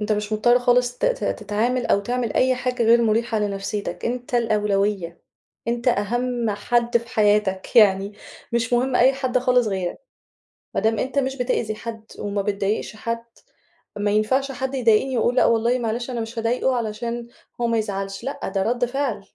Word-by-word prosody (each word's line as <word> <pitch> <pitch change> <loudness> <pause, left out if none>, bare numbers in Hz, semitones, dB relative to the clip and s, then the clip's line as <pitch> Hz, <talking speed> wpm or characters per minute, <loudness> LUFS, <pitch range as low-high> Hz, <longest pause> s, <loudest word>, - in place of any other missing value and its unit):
أنت 210 +1 0
مش 210 0 -2
مُضطر 240 +3 +4
خالص 245 0 +2
ت - - -2
ت - - 0
تتعامل 230 +4 -1
أو 200 - +3
تعمل 240 +1 -2
أي 255 0 +3
حاجة 250 -1 -2
غير 230 +1 +5
مُريحة 225 0 +1
لنفسيتك، 205 0 -3
أنت 245 +1 -3
الأولوية، 205 -6 0 0.5
أنت 235 +1 0
أهم 240 +2 0
حد 235 +3 +1
في 235 0 -2
حياتك، 205 -2 +1
يعني 200 -2 +5 0.4
مش 235 0 0
مُهم 250 +1 +2
أي 255 +2 +5
حد 260 -2 0
خالص 250 -1 +2
غيرك، 190 -3 -3 0.8
ما - - 0
دام 220 -1 +1
أنت 265 +2 0
مش 265 0 -1
بتأذي 240 -4 -1
حد، 225 0 -7
وما 200 0 -2
بتضايقش 200 +2 -2
حد، 230 +1 -4 0.7
ما 205 0 0
ينفعش 260 +7 +1
حد 265 +1 -4
يضايقني 245 +1 +2
وأقول 240 +2 +1
لأ، - - +5
والله 230 +2 +2
معلش 235 +1 -3
أنا 240 -2 -3
مش 225 +1 -6
هاضايقه 245 +3 +1
علشان 235 +1 -3 0.3
هو 240 - +2
ما 230 -1 +1
يزعلش، 195 -2 -4
لأ، 275 - -4
ده 195 0 -1
ردّ 240 +4 +1
فعل. 260 -2 -2
230 Hz, 175 wpm, -23 LUFS, 210-245 Hz, 0.8 s, غير